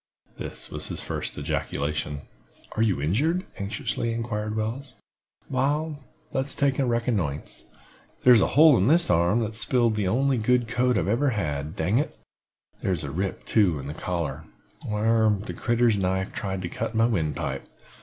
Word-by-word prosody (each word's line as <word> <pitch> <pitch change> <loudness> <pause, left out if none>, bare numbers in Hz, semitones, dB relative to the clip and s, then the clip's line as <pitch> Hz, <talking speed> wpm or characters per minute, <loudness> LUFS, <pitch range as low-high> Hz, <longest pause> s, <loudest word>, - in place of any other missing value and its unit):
This - - -7
was - - -4
his - - -3
first - - -4
ejaculation. 75 0 -2 0.5
"Are 110 - 0
you 105 -9 +2
injured?" 145 - +1
anxiously 105 +3 -2
inquired 110 -2 -3
Wells. 125 +5 -3 0.5
"Wal, 145 +3 -1 0.3
let's 135 +1 -1
take 140 -1 +1
a 135 - +3
reconnoissance. 110 - -1 0.6
Here's 125 -3 +7
a - - +3
hole 155 -2 +8
in 95 - +2
this 165 - +4
arm, 85 +7 +3
that's 110 0 -3
sp'iled 120 -3 +2
the 105 -3 -1
only 130 +5 +2
good 120 +1 +2
coat 125 +1 +1
I - - +2
ever 125 +8 +2
had, 75 - -2
dang 95 +9 +1
it! 150 - -3 0.6
Here's 90 -5 -1
a 70 - -4
rip, 95 +5 -3
too, 95 -8 +3
in 70 - -7
the 70 - -5
collar, 85 0 -3 0.4
whar 110 +1 +3
that - - -7
critter's 120 -3 +2
knife 95 0 -1
tried 95 -3 -3
to - - -2
cut 110 - -4
my 115 +1 +4
windpipe. 85 -10 -2
110 Hz, 165 wpm, -26 LUFS, 95-125 Hz, 0.6 s, hole